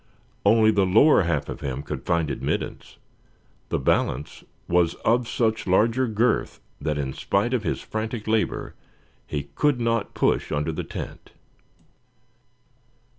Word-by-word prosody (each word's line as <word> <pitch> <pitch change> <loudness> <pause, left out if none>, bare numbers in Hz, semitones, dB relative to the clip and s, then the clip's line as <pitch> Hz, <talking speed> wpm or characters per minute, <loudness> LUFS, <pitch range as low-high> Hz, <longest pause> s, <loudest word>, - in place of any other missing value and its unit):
Only 110 +1 +5
the 100 -3 +2
lower 110 +11 +6
half 85 -5 -1
of - - -7
him 70 0 -4
could - - -6
find 85 -3 +1
admittance; - - -4 0.7
the - - 0
balance 70 +4 -1 0.2
was 85 -1 +2
of 120 0 +3
such 110 -3 0
larger 115 +7 +3
girth 110 +1 0 0.2
that 75 -1 -1
in 65 -2 -2
spite 100 - 0
of 125 - +1
his 95 - -2
frantic 110 0 -4
labor 110 0 0 0.5
he 70 -1 -4
could 145 - +2
not 115 -2 -1
push - - +1
under 75 +2 0
the 80 - -4
tent. - - -8
105 Hz, 135 wpm, -24 LUFS, 80-115 Hz, 0.7 s, lower